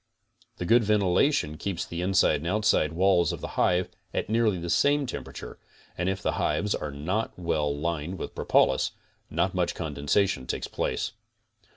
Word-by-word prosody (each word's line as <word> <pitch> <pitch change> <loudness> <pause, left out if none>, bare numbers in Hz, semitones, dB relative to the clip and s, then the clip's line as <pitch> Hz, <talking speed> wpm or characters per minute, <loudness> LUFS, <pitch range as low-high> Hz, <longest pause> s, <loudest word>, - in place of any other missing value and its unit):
The 90 - -4
good 115 +5 +5
ventilation 100 - +2
keeps 90 -2 -3
the 85 +1 -5
inside 90 -4 +3
and 80 +3 -6
outside 105 -5 +2
walls 90 -1 +3
of - - -5
the - - -6
hive 90 +1 +2 0.3
at - - -2
nearly 110 -4 +2
the 85 0 -5
same 140 - +3
temperature 120 - -7 0.4
and 90 +2 -1
if 95 0 -3
the - - +1
hives 80 +8 +1
are 75 - -3
not 85 +11 -3
well 75 -4 0
lined 85 +3 -3
with - - -6
propolis, 65 - +2 0.4
not 85 +3 0
much 90 -2 0
condensation 75 0 0
takes - - -2
place. - - -2
90 Hz, 165 wpm, -27 LUFS, 80-100 Hz, 0.4 s, good